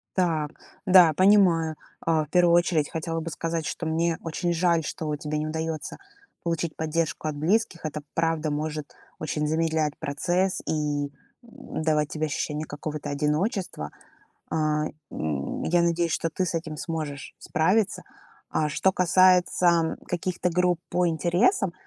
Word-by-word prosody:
Так. 160 -5 +1 0.3
Да, 180 -4 +7
понимаю. 180 -4 +4 0.3
А, 160 -2 +1
в - - -25
первую 175 0 +4
очередь 170 -3 +2
хотела 165 0 -3
бы 165 +1 -4
сказать, 165 0 -2
что 165 - -4
мне 165 +1 +1
очень 170 +2 -1
жаль, 170 -1 +2
что 150 0 -3
тебе 150 +1 -3
не 155 - -2
удается 160 0 -4 0.5
получить 165 -1 -2
поддержку 160 0 -1
от 150 - -2
близких. 175 +3 0
Это 150 0 -3
правда 165 -2 0
может 150 0 -3 0.3
очень 150 -1 -2
замедлять 160 -1 0
процесс 175 +5 0
и, 150 -2 0
м, 140 - -7 0.3
давать 160 - -2
тебе 155 0 -2
ощущение 150 +1 -3
какого-то 150 0 -5
одиночества. 155 - -1 0.6
А, 155 -1 +1 0.3
м, 75 -3 -3
я 175 +1 +3
надеюсь, 170 -1 +1
что 165 - 0
ты 185 +3 -1
с 175 - -3
этим 160 -2 -4
сможешь 150 -4 -5
справиться. 185 +5 +1 0.5
А 155 -1 0
что 190 +6 +2
касается 180 -2 +4
каких-то 180 +1 -1
групп 180 0 +2
по 180 0 +2
интересам, 175 - +2
165 Hz, 145 wpm, -26 LUFS, 155-175 Hz, 0.6 s, Да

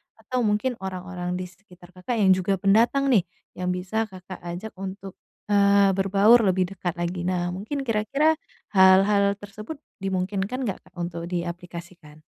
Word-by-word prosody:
atau 225 +3 -4
mungkin 215 +4 0
orang-orang 185 -1 -5
di 185 - -3
sekitar 180 -1 -18
Kakak 185 +7 -4
yang 190 -2 +5
juga 185 +1 +2
pendatang 235 +7 +3
nih 200 -8 +4 0.3
yang 180 0 0
bisa 220 +5 -2
Kakak 185 -2 -10
ajak 175 +5 -6
untuk, 195 0 -7 0.3
eee, 200 -1 +5
berbaur 200 +4 +5
lebih 185 0 +1
dekat 175 -2 -3
lagi. 175 +1 -3
Nah 175 -1 -1
mungkin 220 +10 -4
kira-kira, 275 +7 +1 0.3
hal-hal 200 +1 +5
tersebut 205 +8 -9 0.2
dimungkinkan 195 +6 -2
nggak 200 -6 -3
Kak 185 - -24
untuk 170 -1 -4
diaplikasikan? 175 -2 -7
190 Hz, 145 wpm, -25 LUFS, 180-210 Hz, 0.3 s, yang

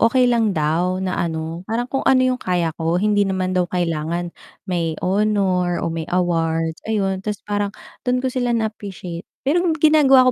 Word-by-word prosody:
okey 250 +3 +4
lang 225 -4 +2
daw 165 +4 +1
na 185 -1 -2
ano, 160 0 -3
parang 235 +2 0
kung 270 - 0
ano 260 -1 +5
yung 255 0 0
kaya 175 -3 0
ko, 165 +1 +1
hindi 205 +1 +2
naman 185 -1 -1
daw 180 -1 +1
kailangan 170 0 -2 0.3
may 170 -4 -1
honor 190 -3 +1
o 165 - -1
may 165 0 -4
awards, 165 -2 0
ayun. 195 -3 0
Ta's 205 0 -4
parang 205 -1 -1 0.4
do'n 250 0 +1
ko 260 - +2
sila 245 -2 0
na-appreciate 200 -6 -5 0.2
pero 300 +6 +3 0.2
ginagawa 275 -5 +6
185 Hz, 170 wpm, -21 LUFS, 170-220 Hz, 0.4 s, ginagawa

